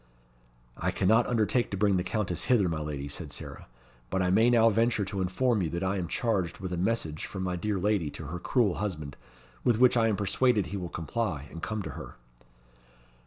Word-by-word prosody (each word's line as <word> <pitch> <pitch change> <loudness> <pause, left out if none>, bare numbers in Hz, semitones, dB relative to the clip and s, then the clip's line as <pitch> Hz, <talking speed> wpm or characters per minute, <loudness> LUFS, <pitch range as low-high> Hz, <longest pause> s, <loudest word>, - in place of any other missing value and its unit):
"I - - -1
cannot 110 +5 +3
undertake 120 +1 +1
to 100 - -3
bring 100 -1 +3
the 90 - 0
Countess 100 -1 -2
hither, 120 -6 +3
my 80 -2 -2
lady," 75 -2 -4
said 70 - -6
Sarah. - - -8 0.4
"But 95 -1 0
I 90 - +1
may 110 +5 +5
now 115 -2 +5
venture 115 -1 +2
to 95 0 -3
inform 105 +5 +1
you 85 - -1
that 85 +3 -3
I 95 +1 0
am 90 -2 -2
charged 95 -7 -1
with 95 -2 -5
a - - 0
message 85 -5 -1
from 95 -1 -5
my 90 -1 -1
dear 105 +3 -1
lady 100 -4 +1
to 80 - -7
her 85 +5 -5
cruel 110 -2 +1
husband, 75 -9 -4 0.5
with 120 -3 +3
which 125 +1 +5
I 115 -1 +4
am 110 - +1
persuaded 105 +2 +2
he 100 - -5
will 90 -2 -5
comply, 80 -3 -3
and 85 - -8
come 110 -2 -3
to - - -5
her." - - -9
95 Hz, 215 wpm, -29 LUFS, 90-115 Hz, 0.5 s, may